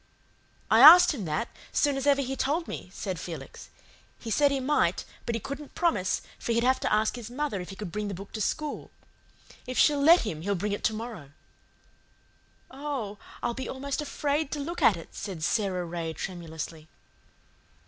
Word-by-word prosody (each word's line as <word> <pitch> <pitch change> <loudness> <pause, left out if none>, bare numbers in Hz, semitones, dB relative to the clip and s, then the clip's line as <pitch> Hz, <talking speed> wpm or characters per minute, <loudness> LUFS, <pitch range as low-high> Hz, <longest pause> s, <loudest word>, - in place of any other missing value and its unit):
"I 220 - +6
asked 340 +6 +10
him 220 -10 -5
that, 155 +8 -1 0.2
soon 290 -2 +2
as 270 +1 -2
ever 280 -1 +4
he 265 +1 -3
told 310 +6 -1
me," - - -7
said 190 -3 -4
Felix. 170 0 -8 0.5
"He 225 - -7
said 285 +5 +4
he 280 -1 0
might, 290 +3 +1 0.2
but 235 - 0
he - - -1
couldn't 280 +5 -8
promise, 315 - +1 0.2
for 235 - -1
he'd 235 +1 +2
have 260 +1 +3
to - - -1
ask 215 +2 +2
his 240 -2 -7
mother 255 -6 -2
if 180 - -8
he 195 - -8
could 195 -3 -6
bring 210 +3 -3
the 200 - -4
book 195 +2 -10
to 215 - -5
school. 300 +8 -2 0.8
If 255 - -4
she'll 290 -2 +4
let 330 +5 +7
him 165 -9 -4
he'll 200 +3 -1
bring 205 +3 -2
it 205 - -3
to 220 - +2
morrow." 215 - -7 1.4
"Oh, 265 -7 -5 0.2
I'll 240 - 0
be 265 +2 -5
almost 275 +2 -3
afraid 295 0 -1
to 300 - -3
look 335 +5 -4
at 195 - +5
it," 165 - -11
said 185 -6 -6
Sara 185 -2 0
Ray 165 -1 -4
tremulously. 160 -2 -6
230 Hz, 190 wpm, -28 LUFS, 190-280 Hz, 1.4 s, asked